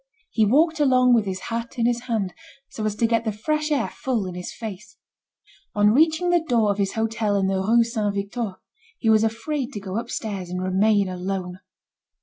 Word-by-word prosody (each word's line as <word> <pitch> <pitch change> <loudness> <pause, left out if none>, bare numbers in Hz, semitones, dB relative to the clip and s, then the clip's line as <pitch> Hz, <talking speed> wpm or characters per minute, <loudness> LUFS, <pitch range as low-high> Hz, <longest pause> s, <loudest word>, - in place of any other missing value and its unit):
He 220 -2 +3
walked 315 +7 +3
along 255 -3 +4
with 225 -3 +3
his 190 -1 -4
hat 230 +1 -5
in 230 - +1
his 240 0 +2
hand, 205 -5 -1 0.4
so 215 - -5
as 210 -1 -1
to 230 - +1
get 230 0 +1
the 220 - -1
fresh 305 +8 -1
air 290 - +1
full 240 -7 -2
in 185 - -5
his 180 0 -6
face. 210 -2 -8 0.8
On 205 0 +5
reaching 320 +5 +3
the 345 -2 +3
door 230 -8 +2
of 200 - -3
his 195 -1 0
hotel 220 -2 0
in 195 -1 +2
the 190 0 0
Rue 230 +4 +4
Saint 215 -3 -2
Victor, 200 0 -3 0.4
he 225 - +2
was 220 0 +5
afraid 245 +5 -2
to 205 - -4
go 195 +2 -3
upstairs, 210 -6 -5
and 180 0 -3
remain 195 +2 +2
alone. 185 0 -4
220 Hz, 200 wpm, -23 LUFS, 195-240 Hz, 0.8 s, On